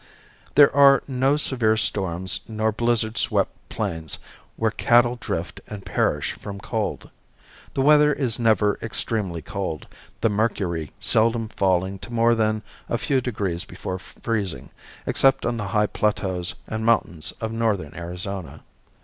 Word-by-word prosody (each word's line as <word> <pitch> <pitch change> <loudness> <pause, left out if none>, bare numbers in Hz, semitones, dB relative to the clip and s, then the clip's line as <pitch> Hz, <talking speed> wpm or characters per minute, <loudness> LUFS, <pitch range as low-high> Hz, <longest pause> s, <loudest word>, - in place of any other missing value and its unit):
There 145 -2 +7
are 140 -1 +7
no 135 +2 +2
severe 120 -7 +2
storms 95 -3 -1
nor 110 0 0
blizzard 115 0 0
swept - - +1 0.2
plains 80 -7 -3 0.4
where 110 -1 +1
cattle 120 +2 +4
drift 85 -7 -4
and 100 -2 -8
perish 85 - 0
from 100 -1 -8
cold. 110 0 -3 0.6
The 135 - +2
weather 150 +1 +6
is 130 -6 0
never 105 -3 +3
extremely 105 -6 -2
cold, 95 -8 -4 0.4
the - - +4
mercury 100 -7 -1
seldom 115 0 +2
falling 95 -1 0
to 120 - -10
more 115 0 +4
than 110 -1 +1 0.3
a 120 - +1
few 135 +1 +1
degrees 100 -8 -2
below 95 0 -6
freezing, 95 - -4 0.3
except 135 -1 +3
upon 120 -1 0
the 105 -3 -3
high 105 0 +2
plateaus 95 -4 -1
and 110 0 -4
mountains 90 -9 +1
of 110 -1 -3
northern 105 -10 -1
Arizona. 90 +1 -6
110 Hz, 140 wpm, -24 LUFS, 95-115 Hz, 0.6 s, There